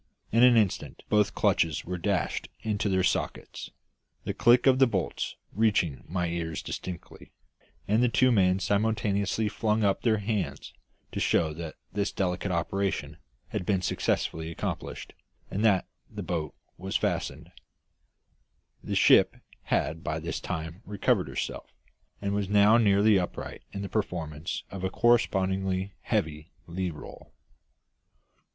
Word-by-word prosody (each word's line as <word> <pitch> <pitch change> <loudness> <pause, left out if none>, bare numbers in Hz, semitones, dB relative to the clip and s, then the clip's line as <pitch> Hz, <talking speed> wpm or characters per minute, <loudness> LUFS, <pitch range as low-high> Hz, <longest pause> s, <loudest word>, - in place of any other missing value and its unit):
In 115 - +4
an 125 -1 +7
instant 105 -5 0
both 105 -1 +2
clutches 80 -3 +1
were 90 0 -4
dashed 100 0 -1
into 105 -1 -1
their 95 -1 +2
sockets 90 - -2 0.5
the - - -2
click 120 +1 +5
of 130 -1 +5
the 135 - +6
bolts 95 -7 -2 0.2
reaching 95 - +1
my 90 +1 -1
ears 85 -2 -3
distinctly 90 -2 -7 0.6
and 110 +3 +3
the 125 - +4
two 130 +2 +4
men 95 -4 +4
simultaneously 105 0 0
flung 110 +1 0
up 100 -1 +2
their 110 -3 +3
hands 105 -1 -3 0.4
to - - -3
show 80 -2 +2
that 80 0 -7 0.2
this 100 -1 0
delicate 90 0 -1
operation 95 +3 -1 0.3
had - - -3
been 95 -1 0
successfully 80 -2 -1
accomplished, 85 - -5 0.4
and 100 - -1
that 100 -4 +3 0.2
the 105 - -6
boat 85 -3 -3 0.2
was - - -1
fast. - - -1 1.5
The - - -3
ship - - +6 0.3
had 80 +1 0
by 75 0 -2
this 80 +1 -4
time 80 +1 -5
recovered 105 -3 +1
herself, - - -4 0.5
and 100 0 -2
was 100 -1 -1
now 105 +3 +6
nearly 100 -1 +5
upright 90 - -5
in 100 - -5
the - - -3
performance 85 -6 -3
of 95 -1 -6
a 95 - +1
correspondingly 95 -5 +1
heavy 75 +1 -2 0.2
lee 90 +1 -3
roll. 75 -3 -11
95 Hz, 140 wpm, -28 LUFS, 85-105 Hz, 1.5 s, an